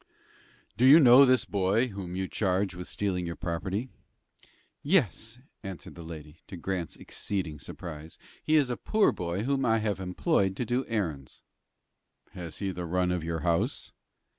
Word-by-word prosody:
"Do 125 - +4
you 145 +5 +10
know 130 -1 +8
this 130 -4 +3
boy 100 +6 +1
whom 95 -4 -6
you 95 0 -2
charge 95 -1 0
with 90 0 -7
stealing 90 -4 -2
your 85 - -4
property?" 95 +7 -3 0.9
"Yes," 120 - +1 0.2
answered 95 -4 -8
the 85 - -10
lady, 80 -1 -10
to 95 - -8
Grant's 90 -1 -3
exceeding 90 -7 -4
surprise; 80 +2 -9 0.3
"he 155 - +2
is 140 -5 +3
a 120 - -2
poor 215 -1 +2
boy 90 +3 -3
whom 135 +2 0
I 115 0 +3
have 105 -3 -1
employed 95 - 0
to 120 - -2
do 125 +3 -1
errands." 80 - -4 0.9
"Has 85 -3 -7
he 100 - -4
had 90 - -6
the 90 -1 -4
run 90 +1 +1
of 90 -2 -1
your 80 0 -3
house?" 85 -1 -1
95 Hz, 165 wpm, -28 LUFS, 85-115 Hz, 0.9 s, you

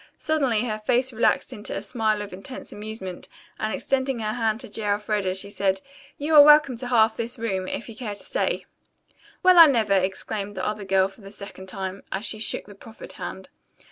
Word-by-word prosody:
Suddenly 270 -8 +1
her 215 -2 -3
face 250 +3 +1
relaxed 225 - +1
into 210 - -5
a - - -4
smile 215 -1 0
of 205 - -9
intense 200 +8 -7
amusement, 205 -4 -7 0.3
and 215 - -1
extending 265 +1 0
her 215 -1 -2
hand 225 -2 0
to 250 - -7
J. 220 - -6
Elfreda, 205 -2 0
she 200 +1 -4
said, 195 -1 0 0.4
"You 300 +2 -2
are 295 - +11
welcome 295 -3 +7
to 250 +1 -5
half 225 -3 +4
this 235 +2 -4
room, 190 -5 -2
if - - -4
you 230 - -9
care 215 -5 -5
to - - -7
stay." - - -1 0.8
"Well, 365 -1 +7
I 330 - +12
never!" 225 -7 +2
exclaimed 195 +2 -1
the 185 - -2
other 210 -1 -3
girl 190 0 +3
for 195 - -16
the 195 0 -11
second 200 -2 -8
time, 190 0 -5
as 195 +3 -2
she 215 - -2
shook 220 - 0
the 205 - -12
proffered 220 +3 -11
hand. - - -7
215 Hz, 205 wpm, -24 LUFS, 195-245 Hz, 0.8 s, I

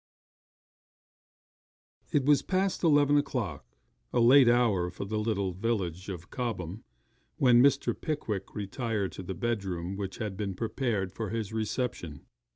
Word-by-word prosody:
It 140 -3 +2
was 145 0 +5
past 190 0 -1
eleven 145 -3 +5
o'clock 110 - -3 0.4
a 125 - +1
late 125 +2 +7
hour 110 -7 +3
for 95 - -6
the 105 +2 -2
little 100 -4 -1
village 95 -3 -2
of 90 -2 -7
Cobham 110 -6 -4 0.5
when 120 -2 +6
Mr. 140 +1 +3
Pickwick 110 - -4
retired 105 0 -2
to - - -8
the 95 +1 -5
bedroom 95 -6 -2
which 95 -1 -5
had 105 -4 -4
been 100 -1 -3
prepared 110 -3 -1
for 110 -1 -4
his 110 -1 -3
reception. 110 - -3
110 Hz, 135 wpm, -29 LUFS, 95-125 Hz, 0.5 s, late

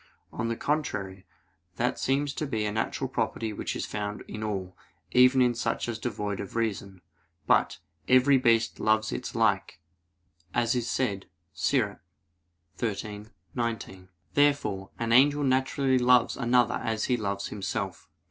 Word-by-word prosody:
On 115 - -2
the 115 - -1
contrary, 100 -11 -3 0.5
That - - -1
seems 140 +1 0
to 155 - -3
be 110 -5 -1
a 105 - -1
natural 110 +1 -2
property 110 -2 -2
which - - -4
is - - -3
found 105 0 -4
in 110 - -6
all, 95 -4 -4 0.4
even 125 +1 +6
in 120 -1 +3
such 120 - -2
as 115 -1 -4
devoid 105 -4 -3
of 100 - -7
reason. 100 -5 -2 0.4
But, - - +3 0.3
"every 130 +2 +5
beast 115 -3 +2
loves 110 +1 +2
its 125 - -5
like," 100 -6 +1 0.8
as 120 -1 +2
is 120 -2 -1
said, 100 -7 -1 0.3
Ecclus. 105 - 0 0.8
13:19. 105 -2 -5 0.3
Therefore 140 -10 +2
an 115 -1 -2
angel 145 +4 +5
naturally 130 0 +2
loves 125 -1 +4
another 125 -1 +2
as 110 -1 -1
he 125 - +2
loves 100 -3 -3
himself. 100 -2 -4
115 Hz, 140 wpm, -28 LUFS, 105-125 Hz, 0.8 s, even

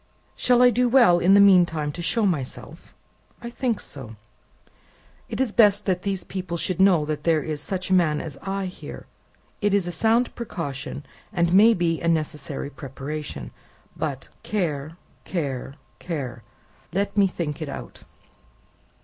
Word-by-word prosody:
"Shall 250 0 +4
I 250 - +7
do 245 +1 +2
well, 235 -9 +6
in 190 +3 +5
the - - +7
mean 195 -3 +7
time, 155 -3 -3
to 170 - -7
show 220 +6 +1
myself? 150 -9 -4 0.4
I 235 0 -7
think 240 -3 -1
so. 120 -6 -8 1.1
It - - -5
is 265 -4 +1
best 210 -2 +4
that 185 -2 0
these 195 -2 -2
people 180 -2 -5
should 180 +1 -2
know 180 -6 +5
there 155 +1 0
is 150 -1 -4
such 185 +2 -4
a - - +5
man 160 -5 +3
as 155 -2 -6
I 195 0 -3
here; 185 - -8 0.6
it 205 -1 +2
is 200 -3 +1
a 175 - -3
sound 225 +8 +2
precaution, 145 - -5 0.3
and 170 -4 +1
may 220 +4 +7
be 165 -2 0
a 170 - -1
necessary 150 -3 -2
preparation. 140 +3 -6 0.4
But - - -4
care, 160 -6 -3 0.3
care, 140 -6 -4 0.2
care! 135 -9 -5 0.5
Let 200 +3 -1
me 200 -2 +5
think 165 -4 -4
it 155 - -4
out!" 135 - -8
175 Hz, 160 wpm, -24 LUFS, 150-200 Hz, 1.1 s, I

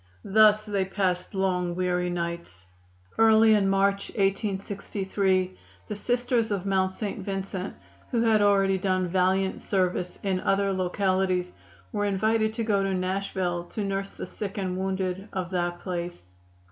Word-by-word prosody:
Thus 215 +1 +5
they 200 -2 0
passed 190 -1 -1
long, 180 -2 0
weary 180 -1 0
nights. 170 - -5 0.5
Early 220 0 +6
in 200 -2 +3
March, 195 +1 +1
1863, 195 -2 0 0.3
the 210 - -4
Sisters 245 +1 0
of 200 -3 -2
Mount 190 -1 +1
St. 210 -1 -4
Vincent, 195 -1 -4 0.3
who 235 -2 +1
had 220 -2 +4
already 195 -2 +3
done 185 -1 +1
valiant 190 +2 +1
service 180 -2 -1
in 190 -2 0
other 195 +1 +1
localities, 185 -1 0 0.4
were 205 -1 -1
invited 220 +2 +1
to 230 - -1
go 205 -3 +2
to 195 -1 0
Nashville 185 -2 -2
to 210 +4 -4
nurse 195 0 -2
the - - -7
sick 205 0 -6
and 185 -2 -2
wounded 190 +1 -2
of 185 -1 -3
that 175 -1 -1
place. 175 - -5
195 Hz, 145 wpm, -26 LUFS, 185-205 Hz, 0.5 s, Early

